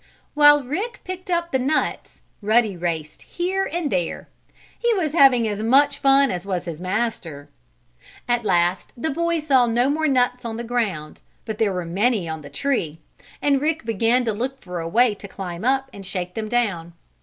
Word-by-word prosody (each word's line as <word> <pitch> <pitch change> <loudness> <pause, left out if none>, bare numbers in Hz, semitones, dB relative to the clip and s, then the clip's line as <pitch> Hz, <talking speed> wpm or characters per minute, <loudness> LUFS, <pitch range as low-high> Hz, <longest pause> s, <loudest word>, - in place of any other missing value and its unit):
While 290 -1 +6
Rick 395 - -4
picked 370 0 -7
up 340 -1 0
the 265 - +1
nuts 275 +5 -2 0.2
Ruddy 215 -1 +2
raced 165 -3 -4
here 380 +2 -2
and 335 -4 -2
there. 175 -3 -2 0.5
He 475 0 +2
was 320 -6 -1
having 260 -7 +5
as 210 0 -3
much 280 +5 +3
fun 275 0 +4
as 180 -1 -4
was 185 -3 -3
his 170 -1 -6
master. 185 -7 -3 0.8
At 240 -1 +1
last 175 -2 +1
the 315 +7 -2
boy 335 +3 0
saw 275 -6 +3
no 240 +4 +2
more 315 +1 0
nuts 250 -2 +1
on 225 -1 -5
the 235 - -4
ground, 215 -11 -3 0.2
but 220 -2 -5
there 220 -3 +2
were 180 -2 -3
many 200 +2 0
on 160 -1 -5
the 145 - -11
tree, 165 - -2 0.5
and 280 -2 +2
Rick 315 -2 -1
began 230 +3 +1
to 225 - 0
look 260 +5 -4
for 180 -6 -6
a 165 0 -4
way 235 +4 +3
to 200 0 -10
climb 185 -2 -7
up 265 +2 +1
and 200 - -9
shake 180 -2 -4
them 215 +1 -4
down. 195 -9 -1
235 Hz, 190 wpm, -22 LUFS, 185-280 Hz, 0.8 s, While